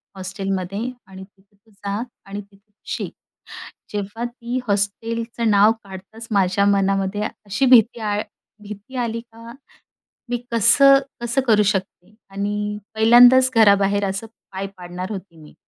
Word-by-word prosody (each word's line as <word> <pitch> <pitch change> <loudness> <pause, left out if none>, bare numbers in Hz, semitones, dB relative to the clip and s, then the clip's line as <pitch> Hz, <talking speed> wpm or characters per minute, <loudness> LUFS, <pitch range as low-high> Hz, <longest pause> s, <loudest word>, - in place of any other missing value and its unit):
हॉस्टेलमध्ये 195 0 -4 0.3
आणि 190 0 -11
तिथं 195 +1 -23
तू 215 +2 -30
जा 200 +1 -5 0.2
आणि 200 +1 -6
तिथे 200 +1 -24
शिक. - - -5 0.8
जेव्हा 205 +3 -4
ती 240 0 -4
हॉस्टेलचं 225 +3 -1
नाव 205 +1 +5
काढताच 195 +4 -11
माझ्या 200 -1 +2
मनामध्ये 195 0 +1 0.2
अशी 215 +7 0
भीती 240 -2 +5
आल 210 -1 -1 0.4
भीती 210 +5 -10
आली, 230 -2 -2
का, 230 0 -13 0.8
मी 245 - 0
कसं, 255 +5 +6 0.2
कसं 240 +3 0
करू 210 -2 +5
शकते 190 -1 -3 0.2
आणि 205 +1 -3 0.2
पहिल्यांदाच 245 +3 +7
घराबाहेर 200 -2 +4
असं 195 +4 -5 0.2
पाय 195 +1 -4
पाडणार 180 +2 -7
होती 190 -4 -8
मी. 150 -1 -15
205 Hz, 130 wpm, -21 LUFS, 195-230 Hz, 0.8 s, पहिल्यांदाच